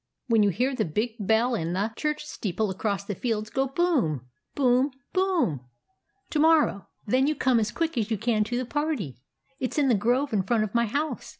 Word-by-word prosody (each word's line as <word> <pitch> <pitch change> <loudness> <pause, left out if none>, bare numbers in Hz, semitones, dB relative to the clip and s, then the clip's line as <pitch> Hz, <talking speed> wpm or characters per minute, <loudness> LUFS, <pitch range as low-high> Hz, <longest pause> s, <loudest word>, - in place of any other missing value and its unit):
When 225 -2 +4
you 205 - +4
hear 250 +8 0
the 245 -4 0
big 215 +8 -1
bell 220 +5 +2
in 170 -6 -1
the 205 +4 -1
church 300 +1 -2
steeple 210 - -2
across 200 +1 -2
the 205 - -3
fields 215 +1 -2
go 270 0 +1
boom! 265 - 0 0.3
boom! 255 0 +3 0.2
boom! 345 - +1 0.6
to 305 - 0
morrow, 310 -10 +3 0.2
then 260 +6 +2
you 305 - +1
come 255 -4 +3
as 215 -1 -1
quick 330 -1 -2
as 215 -1 -1
you 220 - 0
can 220 0 +1
to 240 +3 -2
the 255 - -2
party. 255 - -3 0.4
It 255 - -2
's - - -6
in 285 -3 +3
the - - +5
grove 245 +6 +1
in 205 - +3
front 215 +3 +1
of 215 - -4
my 235 -1 +2
house. 290 +7 -2
235 Hz, 210 wpm, -26 LUFS, 205-280 Hz, 0.6 s, the